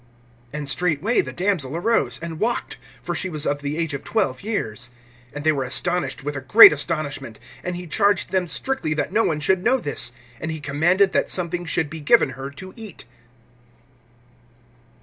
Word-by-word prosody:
(42)And 150 -1 -5
straightway 165 - +1
the - - -7
damsel 175 -7 -1
arose, 170 - +1
and 165 -1 -6
walked; 235 +2 -2 0.3
for - - -3
she 185 - -2
was 155 -3 0
of 145 0 -1
the 145 +2 -3
age 165 -3 -2
of 140 - -5
twelve 130 0 -1
years. 125 - -3 0.4
And 145 - -7
they 155 - +4
were 140 -3 -1
astonished 135 +1 -1
with 145 +1 -4
a 140 - -4
great 130 +3 +9
astonishment. 145 -6 -4 0.2
(43)And 180 0 -3
he 180 0 -7
charged 200 +3 +1
them 185 -2 0
strictly 160 - -2
that - - -2
no 225 - +3
one 155 -2 0
should 185 +4 +1
know 250 +4 +3
this. 145 - -2 0.3
And 160 - -4
he 160 -1 -4
commanded 175 +7 +2
that - - +1
something 175 -1 0
should 155 0 0
be 160 - -6
given 155 - +4
her 135 +1 -7
to 185 +7 -11
eat. 215 - -10
160 Hz, 185 wpm, -22 LUFS, 140-185 Hz, 0.4 s, great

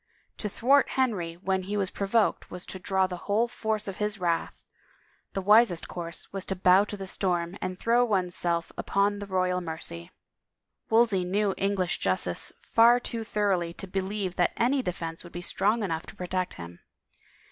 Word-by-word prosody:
To 210 - -3
thwart 270 +7 +3
Henry 200 -11 0
when 190 +1 -1
he 200 +3 -3
was 195 -2 0
provoked 205 +2 +1
was 180 0 -7
to 190 - -7
draw 190 0 +1
the 180 -1 -5
whole 220 +4 +3
force 220 -3 -2
of 195 - -5
his 210 -1 -1
wrath; 170 -2 -1 0.7
the 195 - -2
wisest 210 -3 +5
course 170 0 -4
was 195 -1 -3
to 190 - -2
bow 185 +2 +5
to 205 - -7
the 195 - -6
storm 180 -2 -1
and 185 0 -3
throw 235 +5 +3
one's 190 -6 0
self 170 -1 -1
upon 200 +1 +1
the 205 - -6
royal 185 -1 0
mercy. 160 - -6 0.8
Wolsey 225 -5 +4
knew 195 +2 +1
English 195 -2 0
justice 95 -1 +1
far 235 +2 +5
too 230 -2 -3
thoroughly 195 -6 0
to - - -6
be 195 +1 -2
lieve 190 -1 -3
that 175 - +2
any 260 +4 +2
defense 165 -5 -4
would 175 - -13
be 175 - -6
strong 210 +5 +1
enough 165 -4 -3
to - - -11
protect 185 0 -2
him. 85 0 -9
190 Hz, 180 wpm, -27 LUFS, 180-210 Hz, 0.8 s, wisest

